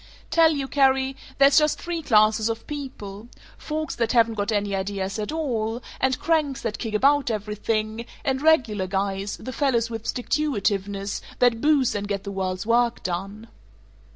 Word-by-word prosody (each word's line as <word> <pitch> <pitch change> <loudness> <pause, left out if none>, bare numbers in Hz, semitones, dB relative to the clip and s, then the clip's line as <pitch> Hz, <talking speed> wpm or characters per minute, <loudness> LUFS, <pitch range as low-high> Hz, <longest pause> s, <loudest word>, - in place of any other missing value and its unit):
"Tell 330 -1 +6
you, 280 -4 -2
Carrie: 270 -1 +2 0.2
There's 275 +2 +6
just 300 0 +1
three 345 -1 -3
classes 215 -3 +3
of 225 0 -4
people: 235 -8 -7 0.3
folks 310 -1 -4
that 230 +1 0
haven't 230 -1 +4
got 205 0 -2
any 205 -2 0
ideas 195 +1 -3
at 210 - -3
all; 240 -7 -2 0.2
and 260 -1 +1
cranks 305 -5 0
that 225 -2 -3
kick 225 -3 -3
about 280 +4 +3
everything; 215 +1 -2 0.2
and 265 -1 0
Regular 240 -12 +3
Guys, 195 +1 -2
the 255 - -7
fellows 235 -5 +1
with 225 -1 -5
sticktuitiveness, 205 -8 -1 0.2
that 240 -2 +3
boost 290 -4 +3
and 205 0 -3
get 200 -1 -3
the 200 - -5
world's 185 -1 -3
work 235 +1 +2
done." 195 +5 -4
230 Hz, 160 wpm, -24 LUFS, 205-270 Hz, 0.3 s, Tell